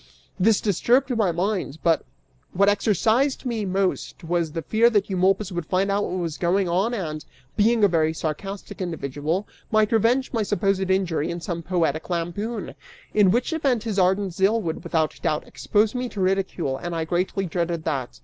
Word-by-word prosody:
{This 210 +3 +4
disturbed 245 +6 +2
my 210 -6 +2
mind 180 -3 -2
but} 165 -1 +3 0.5
what 200 +2 +3
exercised 220 - +1
me 230 -4 -2
most 190 0 -1
was 165 -1 -1
the 165 +1 -4
fear 230 +2 +4
that 210 -3 +1
Eumolpus 190 +2 +1
would 175 -3 -4
find 195 +2 +1
out 205 +1 +1
what 185 - -3
was 165 -4 -3
going 185 +2 +2
on 195 +8 +1
and, 155 -7 -4 0.3
being 225 +1 +3
a - - +8
very 160 -3 +2
sarcastic 175 +6 -5
individual, 160 +2 -2 0.2
might 215 -1 +3
revenge 235 +5 +2
my 230 - +1
supposed 195 -2 0
injury 180 -5 +1
in 170 - -3
some 170 -1 -4
poetic 165 -3 -1
lampoon, 185 +6 -3 0.4
(in 205 -3 +5
which 245 - +1
event 270 -8 +1
his 215 -4 -1
ardent 190 0 +2
zeal 195 +5 +2
would 165 -5 -4
without 160 -3 -1
doubt 150 - -1
expose 210 0 +1
me 250 -1 -2
to 210 - -8
ridicule, 185 -7 0
and 175 +3 -5
I 165 -1 -1
greatly 180 +3 -1
dreaded 170 -1 -2
that. 130 -6 -3
190 Hz, 180 wpm, -24 LUFS, 170-215 Hz, 0.5 s, a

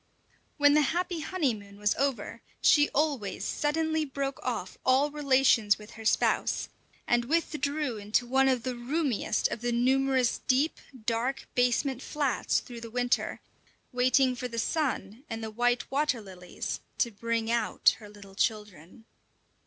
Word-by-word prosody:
When 290 -1 +5
the 300 - +5
happy 345 +4 -1
honeymoon 235 - -2
was 205 0 +1
over, 275 -2 -2 0.2
she 295 -1 +5
always 280 -9 -1
suddenly 315 +1 0
broke 275 -1 -4
off 230 -7 -4
all 270 +3 +3
relations 265 -7 +3
with 210 0 -13
her 225 - -11
spouse, - - +1 0.4
and 240 0 +2
withdrew 300 -3 -1
into 210 +4 0
one 265 +2 +3
of 255 -3 +1
the 255 0 -2
roomiest 250 -3 0
of 220 - -5
the 240 0 -1
numerous 260 +1 +2
deep, 270 +5 +2 0.3
dark, 240 +4 -1
basement 250 +1 +1
flats 285 -4 0
through 240 -2 -10
the 230 - -7
winter, 245 +2 -1 0.5
waiting 255 +1 +3
for 250 +1 -4
the 230 -1 -7
sun 240 -4 -2
and 225 -1 -5
the 220 - -5
white 245 +2 0
water 280 -3 +1
lilies 185 -4 -6 0.2
to 235 - +1
bring 230 +1 -2
out 235 0 +2
her 210 -2 -12
little 200 -2 -14
children. 210 -1 -3
250 Hz, 145 wpm, -29 LUFS, 225-280 Hz, 0.5 s, When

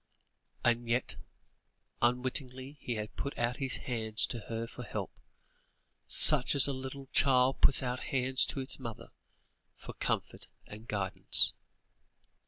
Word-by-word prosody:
And 120 0 0
yet, 120 +2 -1 0.9
unwittingly 130 +3 -2
he 120 - -5
had 105 0 -7
put 140 - -6
out 120 +1 -2
his 135 -2 -2
hands 110 -3 0
to 120 - -6
her 115 0 -4
for 120 - -12
help, 120 - -7 1.2
much 130 - 0
as 140 - +4
a 140 - -2
little 135 +1 -9
child 130 -1 +1
puts 135 - +3
out 125 0 -4
hands 130 0 0
to - - -5
its 130 - -7
mother, 115 -4 -9 0.7
for - - -12
comfort - - -5 0.2
and 110 +2 -13
guidance. 100 -4 0
125 Hz, 135 wpm, -30 LUFS, 115-130 Hz, 1.2 s, as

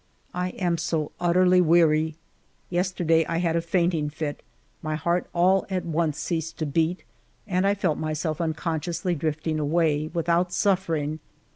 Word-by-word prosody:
I 180 0 -1
am 175 -2 0
so 155 -2 -1
utterly 180 +1 +4
weary! 160 -2 +3 0.6
Yesterday 175 -2 +2
I 165 - -1
had 170 -1 +1
a 170 - +2
fainting 170 -3 0
fit; 150 -1 -5 0.4
my 155 0 -2
heart 170 +3 0
all 185 +2 +3
at 185 -2 -2
once 160 -2 0
ceased 160 +1 -3
to 155 - -2
beat, 165 +5 0 0.4
and 190 -1 +1
I 200 - +3
felt 180 -6 0
myself 155 +1 -2
unconsciously 165 +2 -2
drifting 155 0 -2
away, 155 0 +1
without 170 +1 +1
suf 190 -2 +1
fering. 155 -1 -2
165 Hz, 150 wpm, -25 LUFS, 155-180 Hz, 0.6 s, utterly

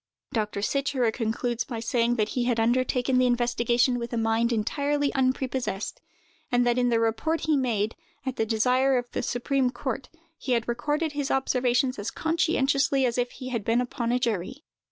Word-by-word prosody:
Dr. 210 -3 -1
Sicherer 275 -2 +1
concludes 235 +1 -1
by 235 -4 -5
saying 235 +1 +1
that 215 -2 0
he 245 -2 -1
had 240 -2 +1
undertaken 250 +2 +2
the 255 - +4
investigation 240 0 +2
with 235 0 -5
a 235 - -2
mind 225 +1 +1
entirely 285 +6 0
unprepossessed; 255 -6 -1 0.5
and 245 0 +3
that 240 +1 +2
in 245 0 +2
the 230 -1 +2
report 230 +9 0
he 310 -1 +2
made, 225 -5 0 0.3
at 260 -1 -2
the - - 0
desire 255 +4 +3
of 245 - -1
the - - -2
supreme 255 +1 0
court, 260 +1 -4 0.3
he 255 - -1
had 235 -1 0
recorded 295 +7 -1
his 285 -1 -2
observations 255 -1 +1
as 205 - -3
conscientiously 280 -4 +1
as 245 0 0
if 245 0 0
he 255 - -7
had 235 -4 -2
been 230 +3 +2
upon 245 -1 -2
a 245 - +3
jury. 235 - -2
245 Hz, 180 wpm, -26 LUFS, 235-265 Hz, 0.5 s, the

